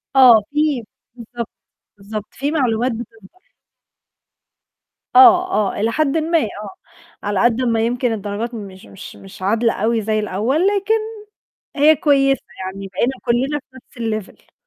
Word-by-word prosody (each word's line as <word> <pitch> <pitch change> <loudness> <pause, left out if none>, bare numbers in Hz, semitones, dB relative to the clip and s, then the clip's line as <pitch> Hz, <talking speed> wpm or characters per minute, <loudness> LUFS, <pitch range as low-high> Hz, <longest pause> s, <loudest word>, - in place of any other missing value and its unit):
آه، 250 -5 +8
في 295 -4 0 0.3
بالضبط، 235 -1 -7 0.5
بالضبط، 210 +1 -7
في 285 +3 -3
معلومات 250 -4 0
بتوضح. 225 - -11 1.7
آه، 370 -1 +7
آه، 210 -2 0
إلى 225 +2 +1
حدٍ 310 +3 +1
ما، 330 +2 +1
آه. 260 - -1 0.8
على 205 -2 -1
قد 240 +1 +2
ما 230 -3 +1
يمكن 245 +1 0
الدرجات 215 +3 -4
مش 200 -2 -9
مش 195 - -11
مش 195 0 -14
عادلة 225 +4 +1
أوي 225 +2 0
زي 215 +1 0
الأول، 225 - 0
لكن 405 +1 +1 0.8
هي 305 +2 +5
كويسة، 275 -2 +2 0.2
يعني 195 +1 -6
بقينا 215 +7 -1
كُلّنا 260 +5 0
في 260 -1 -27 0.3
نَفْس 215 -3 -2
الlevel. - - -31
235 Hz, 140 wpm, -19 LUFS, 215-280 Hz, 1.7 s, آه